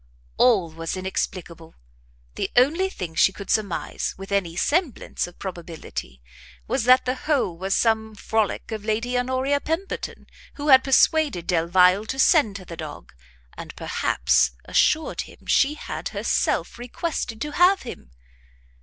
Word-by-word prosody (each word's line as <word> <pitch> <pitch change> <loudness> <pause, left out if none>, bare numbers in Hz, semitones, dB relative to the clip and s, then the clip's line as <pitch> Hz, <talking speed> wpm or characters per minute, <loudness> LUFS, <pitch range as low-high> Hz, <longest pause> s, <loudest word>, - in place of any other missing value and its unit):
All 210 -10 +3
was 165 +3 -5
inexplicable! 175 -3 -5 0.6
the - - -3
only 320 +10 +3
thing 180 - -6
she 190 - +4
could 195 0 -7
surmise, 205 -5 -2
with 195 +1 -10
any 185 -4 0
semblance 290 - -1
of 175 - -15
probability, 165 - -7 0.4
was - - -1
that 255 +1 +5
the 255 - 0
whole 265 - -1
was 190 +3 -1
some 220 -1 +1
frolic 220 +1 -2
of 215 -2 -5
Lady 230 +3 -1
Honoria 260 +3 0
Pemberton, 330 +5 -4 0.3
who 295 +1 -3
had 260 -1 +8
persuaded 275 - +3
Delvile 180 +4 +3
to 265 - -4
send 270 - +4
her 185 - -12
the 170 - -8
dog, 155 - -9 0.4
and - - -9
perhaps - - +1
assured 315 +1 +1
him - - -14
she 285 +2 +3
had - - -6
herself - - -1
requested 245 -2 -4
to 300 - -3
have 365 +5 +4
him. 145 - -9
220 Hz, 145 wpm, -23 LUFS, 175-265 Hz, 0.6 s, had